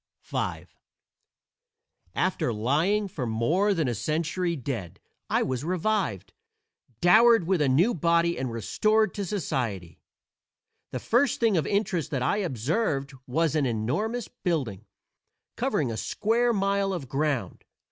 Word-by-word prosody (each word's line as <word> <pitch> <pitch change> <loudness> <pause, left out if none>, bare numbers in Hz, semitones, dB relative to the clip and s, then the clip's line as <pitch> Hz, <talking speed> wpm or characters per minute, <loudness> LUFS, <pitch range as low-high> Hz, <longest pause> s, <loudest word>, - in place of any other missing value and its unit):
V - - -3 1.5
After 185 -9 0
lying 155 - +1
for 140 -9 -4
more 155 - +1
than 160 -5 0
a 120 - 0
century 165 - -1
dead 120 - -5 0.3
I - - +2
was 130 0 -2
revived, 180 - -1 0.7
dowered 225 +2 +6
with 180 -2 +1
a 140 - +3
new 170 - +3
body, 170 +1 +2
and 130 -2 -3
restored 215 - +1
to 200 - -3
society. 120 - -3 0.9
The - - -4
first 245 +2 +1
thing 225 -4 +3
of 155 -5 +1
interest 190 -6 0
that 135 -6 -1
I 165 - +1
observed 140 - -1
was 160 +4 +1
an 145 -3 +2
enormous 170 - -2
building, 130 - -3 0.7
covering 120 - 0
a 110 - -4
square 235 - +1
mile 200 -2 +1
of 160 -7 -5
ground. 135 - -2
165 Hz, 130 wpm, -27 LUFS, 130-200 Hz, 1.5 s, dowered